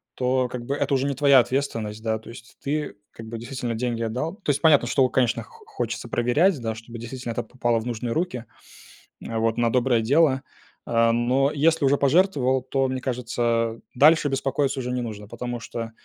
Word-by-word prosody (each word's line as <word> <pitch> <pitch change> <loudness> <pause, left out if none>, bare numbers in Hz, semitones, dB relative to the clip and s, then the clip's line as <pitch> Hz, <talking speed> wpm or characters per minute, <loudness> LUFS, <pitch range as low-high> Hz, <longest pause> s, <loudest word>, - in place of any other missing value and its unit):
то, 130 0 +1
как 125 -1 -6
бы, 140 - -1
это 145 - -1
уже 135 +1 +1
не 140 - 0
твоя 140 -1 +6
ответственность. 115 -4 -2
Да, 110 -1 -1
то 110 - -14
есть 120 0 -13
ты, 150 -2 -2 0.2
как 115 -1 -11
бы, 115 0 -6
действительно 120 0 -4
деньги 115 -1 -2
отдал. 125 - -3
То 205 -8 -7
есть 140 - -2
понятно, 145 -7 +5
что, 135 +1 +3
у, 130 - +2
конечно, 120 -3 +1
хо 455 -2 -18
хочется 440 -1 -4
проверять, 145 +8 +2
да, 110 -1 -3
чтобы 115 +1 -10
действительно 120 0 -6
это 120 - -2
попало 120 -1 -1
в 110 - -7
нужные 120 0 -3
руки, 155 -9 -2 0.8
а 115 -1 -2
вот, 115 0 0
на 120 -1 +2
доброе 125 -2 +2
дело. 140 +2 +3 0.4
А, 115 0 +3
но 125 +4 +2
если 160 0 +2
уже 140 +1 +4
пожертвовал, 140 -4 +2
то, 135 +1 0
мне 130 0 -3
кажется, 120 -2 -1 0.2
дальше 150 +2 +5
беспокоиться 135 0 -1
уже 125 0 -3
не 125 0 -1
нужно, 105 -3 -6
потому 120 +2 -5
что, 115 0 -6
125 Hz, 200 wpm, -24 LUFS, 115-140 Hz, 0.8 s, твоя